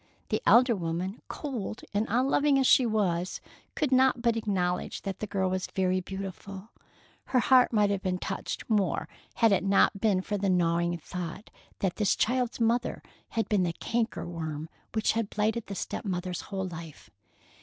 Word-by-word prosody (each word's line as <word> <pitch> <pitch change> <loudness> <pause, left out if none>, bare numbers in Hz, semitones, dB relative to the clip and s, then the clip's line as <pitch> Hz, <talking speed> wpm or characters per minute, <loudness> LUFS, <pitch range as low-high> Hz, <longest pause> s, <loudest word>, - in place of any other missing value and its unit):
The - - 0
elder 240 -1 +6
woman, 180 +3 -3
cold 245 -8 -5
and 210 +2 +1
unloving 275 +5 +3
as 265 - +3
she 255 -1 +6
was, 185 -5 0 0.4
could 295 -4 0
not 260 -1 +4
but 235 -1 +3
acknowledge 185 -5 -1
that 195 -1 -4
the 215 - -3
girl 190 -1 0
was 185 0 -1
very 185 -1 +1
beautiful. 195 +2 -7 0.6
Her 255 - 0
heart 255 0 +5
might 210 -3 +3
have 200 -2 -1
been 185 -2 -1
touched - - -4
more 195 -7 +1 0.3
had 225 -2 +4
it 195 - +3
not 195 0 +3
been 205 -4 +3
for 205 +2 -3
the 195 0 +1
gnawing 170 -1 +2
thought 180 +4 -7 0.3
that 190 -3 0
this 210 -3 +2
child's 250 0 0
mother 235 +1 0 0.3
had 225 - +1
been 205 -3 +2
the 175 -2 0
canker 225 -4 -2
worm 160 -2 -5 0.3
which 220 - +2
had 225 -2 -1
blighted 215 +2 -1
the 200 - -5
step - - -4
mother's 180 -3 -3
whole 190 -2 -2
life. 165 -3 -10
195 Hz, 175 wpm, -28 LUFS, 180-225 Hz, 0.6 s, elder